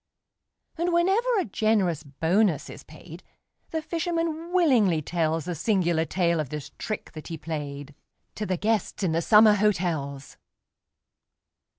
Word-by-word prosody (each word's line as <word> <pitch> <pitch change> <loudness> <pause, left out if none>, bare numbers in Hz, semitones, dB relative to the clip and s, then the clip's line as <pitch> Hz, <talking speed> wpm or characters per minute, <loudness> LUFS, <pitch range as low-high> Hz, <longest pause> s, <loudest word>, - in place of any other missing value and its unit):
And, 350 +1 +1
whenever 380 +8 +2
a 385 - +1
generous 200 -6 +1
bonus 160 +4 0
is - - -10
paid, 165 +3 -12 0.5
The 320 -1 -3
fisherman 330 0 -2
willingly 250 - +3
tells 160 0 -1
The 180 - -3
singular 175 -2 +1
tale 170 -1 0
of 150 -4 -3
this 150 -1 -6
trick 215 - -5
that 155 -2 -9
he 165 - -5
played, 145 -3 -6 0.4
To 210 - -4
the 185 - -1
guests 215 +1 -1
in 180 - +1
the 165 +1 +1
summer 215 +3 +6
hotels. 170 -9 -1
180 Hz, 135 wpm, -26 LUFS, 160-225 Hz, 0.5 s, summer